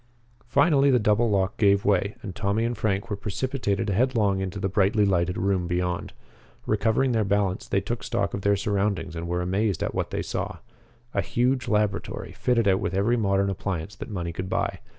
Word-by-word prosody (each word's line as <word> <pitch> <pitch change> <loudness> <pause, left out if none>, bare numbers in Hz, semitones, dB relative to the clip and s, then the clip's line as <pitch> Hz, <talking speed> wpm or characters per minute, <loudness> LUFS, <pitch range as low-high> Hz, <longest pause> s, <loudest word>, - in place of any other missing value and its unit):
Finally 140 +2 +4
the 130 - +5
double 110 +1 +2
lock 100 +1 0
gave 100 -1 +3
way 100 0 +2
and 95 -3 -6
Tommy 100 +3 0
and 120 +1 -1
Frank 100 -2 -1
were - - +1
precipitated 105 -1 -2
headlong 105 -3 +2
into 95 +1 -3
the 95 - 0
brightly 100 +2 +2
lighted 90 -2 +1
room 95 -2 0
beyond. 90 0 -2 0.5
Recovering 110 +5 +2
their 110 -2 +2
balance, 100 -2 0
they - - +1
took - - -4
stock - - -1
of 100 - -3
their 100 +1 +3
surroundings 100 -4 -1
and 85 +1 -4
were 90 +1 -1
amazed 95 +1 0
at - - -2
what - - -2
they - - -3
saw - - -4 0.6
a - - +1
huge 130 +1 0
laboratory, 105 -2 -1
fitted 115 -4 +1
out 95 -1 +4
with 95 - -2
every 105 +5 +2
modern 100 -3 +1
appliance 95 +1 -4
that - - -8
money 85 -5 -4
could 95 +2 -5
buy. - - -1
100 Hz, 190 wpm, -25 LUFS, 95-110 Hz, 0.6 s, the